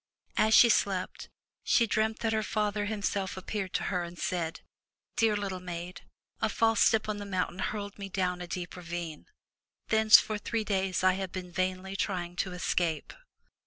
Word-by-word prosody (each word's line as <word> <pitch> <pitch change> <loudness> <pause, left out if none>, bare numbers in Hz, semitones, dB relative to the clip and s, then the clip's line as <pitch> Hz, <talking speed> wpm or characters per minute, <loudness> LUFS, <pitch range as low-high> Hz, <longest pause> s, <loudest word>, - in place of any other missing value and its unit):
As 220 +1 +4
she 240 - +9
slept, 195 -4 0 0.3
she 230 - +4
dreamt 220 0 0
that 225 -1 +1
her 220 - +1
father 210 -1 -1
himself 200 -3 -2
appeared 190 0 -4
to - - 0
her 180 - +1
and 175 0 -7
said: 170 -3 -2 0.5
"Dear 220 -2 +3
little 195 -2 -3
maid, 175 0 -6 0.4
a 220 - +2
false 225 0 +2
step 220 -1 +4
on 215 -1 -2
the 205 - -5
mountain 185 -1 -2
hurled 205 0 -3
me 200 0 -5
down 180 -1 -1
a 175 - -5
deep 175 0 -5
ravine. 170 -3 -6 0.6
Thence 220 -1 +8
for 215 -1 -3
three 225 +1 -2
days 190 -3 0
I 185 0 +5
have 190 -1 -4
been 180 -1 -6
vainly 185 +1 -2
trying 180 -3 -2
to 185 - -1
escape." 175 -2 -1
190 Hz, 175 wpm, -30 LUFS, 180-215 Hz, 0.6 s, she